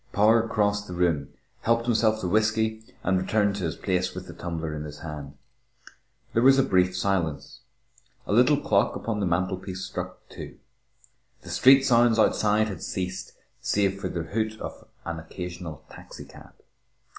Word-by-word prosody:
Power 110 +2 +4
crossed 105 -2 0
the 90 - -6
room, 85 -6 +1 0.3
helped 115 0 +1
himself 110 -2 +2
to 90 - -2
whisky, 110 +2 +1 0.2
and 95 -1 +2
returned 100 +1 +1
to 95 - -2
his 80 - -2
place 90 -1 -1
with 90 0 -6
the - - -10
tumbler 80 -2 -4
in 75 - -5
his 75 -1 -9
hand. 75 -3 -7 1.0
There 115 - +3
was 135 +2 +6
a 135 - +5
brief 90 -3 +2
silence. 85 -7 -1 0.7
A - - -2
little 125 +6 +5
clock - - +2
upon 115 -2 -3
the 100 - 0
mantelpiece 95 +2 -2
struck - - -7
two. - - -10 0.9
The - - -11
street 135 +1 +6
sounds 120 -3 +4
outside 110 0 +3
had 100 - -6
ceased 95 0 -4 0.3
save 100 -1 0
for 95 - -2
the 85 -2 -3
hoot 110 +5 -2
of - - -8 0.2
an 85 -1 -4
occasional 85 -1 -7
taxicab. - - -12
95 Hz, 160 wpm, -26 LUFS, 90-110 Hz, 1.0 s, was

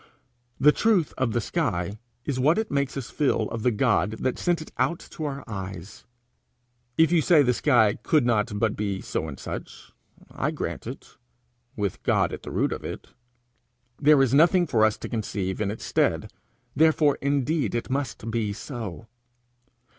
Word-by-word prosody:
The 145 +3 +7
truth 195 -4 +2
of 130 -3 0
the 120 - 0
sky 105 - -2 0.3
is 135 -3 -2
what 150 +6 +3
it 220 0 -2
makes 140 -1 -1
us 130 - -6
feel 145 -3 +1
of 115 - -4
the 125 - +3
God 110 -4 +1
that 130 +3 -2
sent 175 -2 +1
it 155 - -9
out 170 - +2
to 155 - -5
our 140 -1 -4
eyes. 95 -3 -7 0.9
If 160 0 +5
you 170 -2 +4
say 155 -3 +5
the 125 -1 +2
sky 115 -5 +3
could 150 -6 +2
not 105 -3 +1
but 110 0 +1
be 100 -2 -2
so 80 - -3
and 70 -4 -7
such, - - -8 0.4
I - - -1
grant - - -5
it - - -9 0.6
with 100 -4 -3
God - - +1
at - - -6
the - - -8
root - - 0
of - - -5
it. - - -7 0.9
There 145 -1 +6
is 130 -1 +1
nothing 175 +5 +5
for 115 -8 +3
us 110 - +1
to - - -6
conceive 100 -4 -3
in 105 - 0
its 105 - -6
stead - - 0 0.4
therefore 155 -2 +3
indeed 140 +1 0
it 120 - -3
must 135 -5 -3
be 110 -3 -1
so. 115 - -7
125 Hz, 175 wpm, -25 LUFS, 105-150 Hz, 0.9 s, The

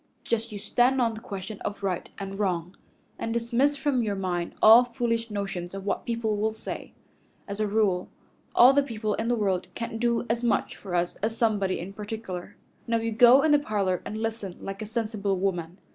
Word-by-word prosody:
Just 230 0 -1
you 210 - -5
stand 245 +6 +2
on 230 -2 +2
the 220 - -7
question 200 -1 -7
of 200 0 -5
right 185 -3 -2
and 195 0 -6
wrong, 180 -3 -1 0.4
and 225 - -2
dismiss 235 +5 +1
from 275 -4 +1
your 210 -3 -1
mind 180 -3 -2
all 225 +3 +9
foolish 235 -2 -2
notions 195 -3 -4
of 195 0 -6
what 205 - -2
people 230 -3 -1
will 215 +1 0
say. 220 - -7 0.5
As 200 0 -5
a 215 - +1
rule, 200 -4 +1 0.5
all 250 +3 +8
the 285 - +5
people 220 -6 -2
in 225 - -2
the 240 - +2
world 190 -4 0
can't 230 -1 -4
do 235 0 +1
as 235 +1 -1
much 235 - +1
for 185 -3 -6
us 175 0 0
as 220 +2 -2
somebody 205 -5 +1
in 185 +3 -7
particular. 205 -3 -6 0.3
Now 230 0 +2
you 230 0 -2
go 245 +4 +7
in 315 - +3
the 295 - +6
parlor 200 -8 -1
and 215 - -5
listen 220 -4 -4
like 195 +1 -6
a 215 - -4
sensible 215 -4 -1
woman. 180 -2 -2
215 Hz, 205 wpm, -27 LUFS, 195-230 Hz, 0.5 s, all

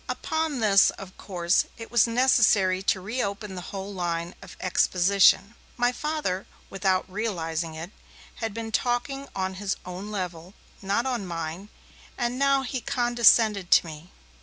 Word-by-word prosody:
Upon 315 -5 -2
this, 200 -3 +5
of 190 -1 -9
course, 175 -2 0
it 225 - -9
was 240 -1 +4
necessary 225 -6 +3
to 195 0 +1
reopen 200 -1 -4
the 180 - -6
whole 195 0 -6
line 175 -1 -3
of - - -12
exposition. 190 +3 +3 0.2
My 245 0 +2
Father, 295 -9 -3 0.2
without 190 -1 0
realizing 170 -6 -3
it, 165 +4 -7 0.5
had 225 -1 -3
been 225 +1 -6
talking 265 +4 -1
on 190 0 -2
his 200 -1 -1
own 185 +3 -7
level, 180 -3 -5 0.3
not 200 +5 0
on 240 -7 -2
mine, 170 +3 -5 0.5
and 245 +1 -2
now 275 -1 +3
he 255 -1 -4
condescended 235 -6 +3
to - - +6
me. 160 +2 -10
200 Hz, 145 wpm, -26 LUFS, 185-240 Hz, 0.5 s, to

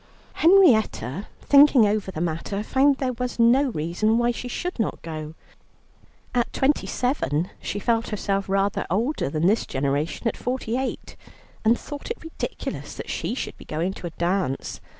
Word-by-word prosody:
Henrietta, 220 - +4 0.2
thinking 280 -4 +7
over 205 -1 0
the 170 - -5
matter, 175 +5 -2
found 270 +4 +3
there 260 -2 -1
was 250 +1 -4
no 240 +4 +5
reason 205 +4 0
why 240 0 +2
she 245 +1 -6
should 350 +5 -4
not 225 - -1
go. 155 -1 -6 1.0
At 240 -1 +1
twenty 280 +2 +1
seven 190 - -1
she - - -3
felt 230 +2 0
herself 200 -2 -2
rather 195 0 0
older 225 - 0
than 155 +3 -1
this 210 +5 +2
generation 140 - -1
at - - 0
forty 245 -2 -3
eight, 265 +1 -4 0.5
and 225 +2 +4
thought 290 +4 -8
it 465 - -3
ridiculous 325 - -5
that - - -6
she - - -2
should - - -5
be - - -12
going 170 +5 -2
to 175 - -7
a - - -7
dance. 175 -5 -1
220 Hz, 165 wpm, -24 LUFS, 175-255 Hz, 1.0 s, thinking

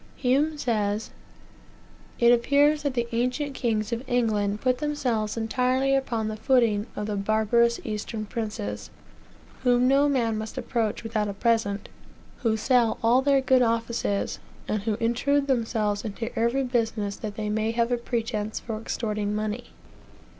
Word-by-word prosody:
Hume 285 +5 +1
says: 215 -5 -1 1.1
"It 235 0 +5
appears 285 +5 +4
that 285 -3 -2
the 240 -1 0
ancient 250 +5 -1
kings 225 -3 -1
of 235 - -2
England 210 -4 +1
put 255 -1 +1
themselves 245 -8 -1
entirely 255 +4 +1
upon 235 -5 -1
the 215 - -3
footing 225 -4 +2
of 210 - -3
the 210 -1 -2
barbarous 220 +3 +2
Eastern 215 0 -4
princes, 205 - -4 0.7
whom 245 0 +3
no 280 +2 +4
man 230 -5 +1
must 220 0 -6
approach 225 -3 -1
without 215 -2 -1
a 200 - -4
present, 210 -2 0 0.5
who 225 -4 0
sell 240 0 +2
all 240 +3 +5
their 275 0 +3
good 260 -1 +4
offices, 230 -3 0 0.3
and 215 -1 -1
who 215 +1 -1
intrude 245 +6 +1
themselves 225 -5 0
into 225 +2 -5
every 235 +4 +1
business 225 -5 -1
that 210 -2 -6
they 210 -1 -3
may 220 +1 0
have 235 +1 0
a 245 - +2
pretence 225 -3 -3
for 220 -2 -5
extorting 210 -2 -2
money. 215 +3 -3
230 Hz, 150 wpm, -26 LUFS, 215-250 Hz, 1.1 s, It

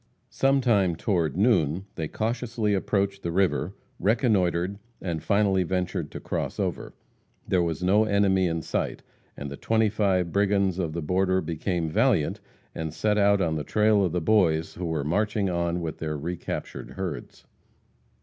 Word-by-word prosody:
Sometime, 120 -10 +2
toward 85 -5 0
noon, 95 - +2
they 80 -2 -3
cautiously 115 +1 -1
approached 100 0 0
the 85 - -3
river, 95 +1 +1 0.2
reconnoitered, 100 -4 +1 0.2
and 85 -4 -3
finally 100 +2 +2
ventured 90 -3 -2
to - - -7
cross - - -4
over. - - -3 0.5
There 90 - +2
was 85 +1 -2
no 105 +4 +4
enemy 100 -3 +3
in 80 -1 -2
sight, - - -3 0.3
and 70 0 -6
the 70 - -6
twenty 110 -1 +2
five 95 -4 +1
brigands 100 -2 +1
of 85 -4 -2
the 85 -1 -3
border 95 +3 +1
became 85 0 -2
valiant, 105 - +1 0.3
and 80 -1 -4
set 105 +6 0
out 100 0 +4
on 80 -3 0
the 75 - -3
trail 105 +1 +3
of 90 - 0
the 90 - -1
Boys 80 -4 +2
who 90 - -5
were 80 -3 -1
marching 105 +4 0
on 85 0 -1
with 80 -2 -5
the 75 -1 -3
recaptured 85 +4 -5
herds. 95 -2 -6
95 Hz, 160 wpm, -26 LUFS, 85-105 Hz, 0.5 s, no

